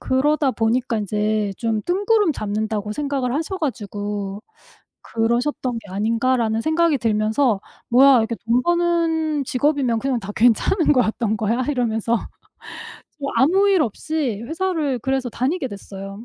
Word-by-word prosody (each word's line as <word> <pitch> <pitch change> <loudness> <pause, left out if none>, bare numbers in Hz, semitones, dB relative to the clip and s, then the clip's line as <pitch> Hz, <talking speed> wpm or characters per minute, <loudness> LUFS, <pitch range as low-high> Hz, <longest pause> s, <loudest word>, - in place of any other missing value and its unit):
그러다 285 +2 +1
보니까 235 0 0
인제 210 0 -1
좀 225 -2 -1
뜬구름 405 0 +2
잡는다고 210 -1 -3
생각을 275 -1 -2
하셔 325 +6 -2
가지고 205 - -4 0.6
'그러셨던 235 +2 -1
게 205 -3 -15
아닌가.'라는 225 +2 +1
생각이 315 -2 +2
들면서 220 0 +1 0.3
'뭐야 265 +2 +7
이렇게 230 +1 0
돈 240 +2 +2
버는 330 -3 +1
직업이면 260 -3 +1
그냥 260 -2 -1
다 195 - -7
괜찮은 245 - +3
거였던 225 -4 +1
거야?' 230 +5 0
이러면서 235 -3 0 1.2
아무 380 +9 +4
일 370 -5 +4
없이 260 -1 -2
회사를 320 -6 -1
그래서 265 +1 -1
다니게 265 +5 -1
됐어요. 195 +1 -9
245 Hz, 310 characters per minute, -21 LUFS, 220-295 Hz, 1.2 s, 뭐야